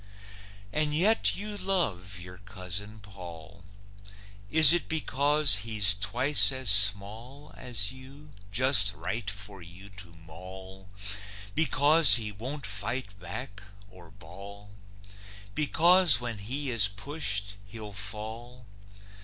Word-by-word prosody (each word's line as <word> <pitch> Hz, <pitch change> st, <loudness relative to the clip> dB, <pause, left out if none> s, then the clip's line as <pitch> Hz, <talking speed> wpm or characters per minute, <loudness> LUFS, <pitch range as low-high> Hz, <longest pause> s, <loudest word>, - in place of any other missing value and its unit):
And 150 Hz, -1 st, -2 dB
yet 210 Hz, +8 st, 0 dB
you 210 Hz, +1 st, -6 dB
love 110 Hz, -, -4 dB
your 90 Hz, 0 st, -13 dB
Cousin 100 Hz, +1 st, -7 dB
Paull. 95 Hz, -1 st, -14 dB, 0.9 s
Is 160 Hz, 0 st, +9 dB
it 175 Hz, -, -2 dB
because 145 Hz, -5 st, +2 dB
he's 105 Hz, -1 st, +1 dB
twice 105 Hz, +10 st, +1 dB
as 130 Hz, -4 st, -1 dB
small 105 Hz, +8 st, +2 dB
As 115 Hz, -4 st, -1 dB
you, 135 Hz, +3 st, -16 dB, 0.2 s
just 110 Hz, -4 st, +2 dB
right 115 Hz, -2 st, -6 dB
for 100 Hz, -1 st, -8 dB
you 90 Hz, +4 st, -15 dB
to 90 Hz, -5 st, -14 dB
maul? 95 Hz, +3 st, -14 dB, 0.6 s
Because 150 Hz, -3 st, +5 dB
he 110 Hz, -2 st, -4 dB
won't 130 Hz, +7 st, -8 dB
fight 100 Hz, +1 st, -5 dB
back, 100 Hz, +3 st, -9 dB, 0.3 s
or 85 Hz, -2 st, -17 dB
bawl? 100 Hz, +5 st, -15 dB, 0.8 s
Because 170 Hz, -, +3 dB
when 120 Hz, -3 st, -7 dB
he 130 Hz, +7 st, -4 dB
is 110 Hz, -5 st, +3 dB
pushed 100 Hz, -2 st, -6 dB
he'll 105 Hz, -1 st, -11 dB
fall? 110 Hz, +5 st, -7 dB
105 Hz, 110 wpm, -26 LUFS, 100-135 Hz, 0.9 s, Is